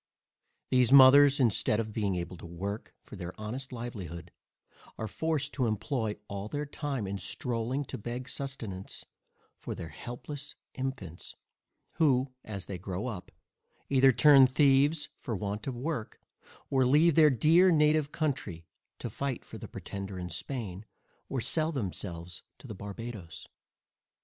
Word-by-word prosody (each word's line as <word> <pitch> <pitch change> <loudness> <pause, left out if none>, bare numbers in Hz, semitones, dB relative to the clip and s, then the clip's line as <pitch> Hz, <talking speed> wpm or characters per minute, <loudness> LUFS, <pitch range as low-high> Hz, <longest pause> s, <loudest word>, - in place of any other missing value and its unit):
These 125 -1 +4
mothers, 140 +1 +8
instead 110 -3 +2
of 110 -1 -3
being 100 -4 0
able 85 +1 -4
to - - -11
work 100 +5 -5
for - - -11
their 90 +1 -7
honest 125 +5 -5
livelihood, 90 -9 -6 0.7
are 110 - -3
forced 155 +1 -2
to 130 -4 +1
employ 110 0 -1
all 100 0 -5
their 145 +6 -3
time 140 -5 -3
in 100 +1 -3
stroling 120 +7 -2
to - - -6
beg 120 +4 -5
sustenance 115 -11 -6 0.5
for - - -5
their 80 - -7
helpless 135 - -7 0.2
infants 130 - -5 0.6
who, 135 -4 +3
as 100 -5 -6
they 95 -3 -6
grow 95 +3 -4
up, 100 -8 -6 0.6
either 135 -1 +6
turn 135 +2 +7
thieves 140 +3 +3
for 115 - -3
want 105 +3 -4
of 130 - -2
work, 130 -4 -4 0.5
or 135 -1 +4
leave 150 +6 +5
their 155 0 +7
dear 160 +8 +5
native 150 -2 +3
country, 120 - -2 0.3
to - - -5
fight 140 -3 -3
for - - -9
the - - -7
Pretender 100 -1 -6
in 90 -1 -5
Spain, 100 - -5 0.5
or 135 - -1
sell 160 +6 0
themselves 90 - -5 0.2
to - - -16
the - - -6
Barbadoes. 100 -2 -8
120 Hz, 145 wpm, -30 LUFS, 100-140 Hz, 0.7 s, mothers